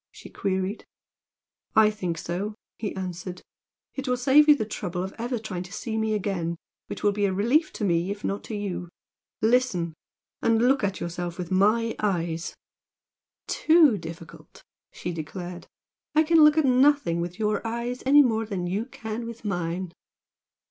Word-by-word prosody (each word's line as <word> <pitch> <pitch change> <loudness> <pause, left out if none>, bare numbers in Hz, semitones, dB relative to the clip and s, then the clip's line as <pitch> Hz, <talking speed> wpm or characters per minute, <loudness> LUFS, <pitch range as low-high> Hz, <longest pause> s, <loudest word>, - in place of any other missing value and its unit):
she - - -13
queried. 190 +2 -2 0.9
"I 215 -1 +6
think 180 -6 -3
so," 190 +7 -4 0.2
he 210 - -3
answered 185 -1 -6 0.5
"It 270 0 -5
will 250 0 +1
save 280 +5 +5
you 300 - +9
the 220 - -2
trouble 180 -4 -4
of 190 - -5
ever 240 +2 -2
trying 215 -5 -5
to 180 0 -9
see 220 +1 -4
me 220 -1 0
again, 180 -5 -2 0.3
which - - -7
will 205 - +4
be 205 0 0
a 195 - +1
relief 240 - +2
to - - -5
me, 175 -1 +1
if 205 +1 -5
not 200 - -2
to 220 - -5
you. 190 -4 -4 0.5
Listen! 220 -8 +2 0.5
and 225 -1 +3
look 255 +1 +3
at 195 -1 -1
yourself 175 0 -4
with 180 -1 -5
MY 215 +4 +3
eyes 170 -5 -1 0.5
" - - -67
"Too 315 -7 +5
difficult!" 165 -1 -11 0.3
she 175 - -5
declared 175 +2 -7 0.5
"I 310 - +6
can 320 0 +5
look 300 +1 +6
at 315 - +4
nothing 260 - +3
with 175 +1 -5
your 215 -1 0
eyes 235 +2 -3
any 285 +2 +7
more 225 -3 0
than 190 -4 -3
you 195 +6 -1
can 230 -2 -6
with 235 -1 -9
mine!" 175 -2 -2
205 Hz, 170 wpm, -26 LUFS, 180-235 Hz, 0.9 s, you